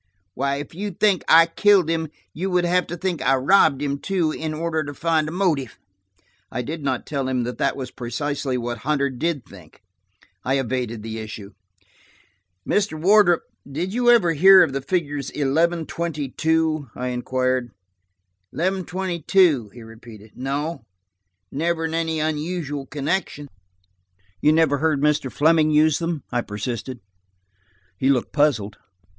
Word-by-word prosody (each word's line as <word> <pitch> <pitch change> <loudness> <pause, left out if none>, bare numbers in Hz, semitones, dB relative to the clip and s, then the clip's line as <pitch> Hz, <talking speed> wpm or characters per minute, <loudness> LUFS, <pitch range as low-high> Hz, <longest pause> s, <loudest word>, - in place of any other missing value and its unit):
Why, 140 +2 -1
if 145 +2 -7
you 205 +5 -4
think 195 0 +1
I 165 +1 +7
killed 190 +1 +3
him, 165 -1 -1 0.3
you 185 +4 -3
would 180 -1 +1
have 180 0 +1
to 175 - -5
think 180 -1 -2
I 135 - +3
robbed 140 0 +3
him, 140 -1 -2
too, 180 -4 0
in 155 0 -4
order 160 0 -2
to 145 0 -7
find 160 -1 0
a - - -6
motive." 160 - -1 0.7
I 125 - -3
did 155 +4 -6
not 130 -3 -2
tell 140 -3 -3
him 130 -2 0
that 125 +1 -5
that - - 0
was 130 -2 -6
precisely 130 +2 -3
what 120 -1 -4
Hunter 140 -1 0
did 145 +1 -2
think. 90 0 -16 0.6
I 135 +2 +1
evaded 120 -4 -3
the 110 0 -5
issue. 110 -2 -8 1.2
"Mr. 200 -7 0
Wardrop, 185 -1 +4 0.3
did 175 +7 -3
you 240 +1 +2
ever 205 -9 +5
hear 190 +5 +8
of - - -1
the 135 - -2
figures 145 -4 -2
eleven 160 +4 0
twenty 155 -5 -4
two?" 160 -1 0
I 125 0 -3
inquired. 130 0 -1 0.8
"Eleven 185 +2 -1
twenty 180 0 -3
two?" 155 - +3
he 120 +1 -12
repeated. 110 -1 -13
"No, 140 +3 -3 0.7
never 165 +2 -1
in 160 - -3
any 165 -1 -1
unusual 150 -2 -3
connection." 145 0 -3 0.9
"You 150 - +5
never 155 -3 +3
heard 155 -2 +1
Mr. 150 -3 +1
Fleming 155 +1 +3
use 155 0 +3
them?" 165 -4 -3
I 120 -1 0
persisted. 115 +4 -5 1.0
He 135 - +2
looked 130 -4 +1
puzzled. 120 -9 +1
150 Hz, 155 wpm, -22 LUFS, 130-170 Hz, 1.2 s, hear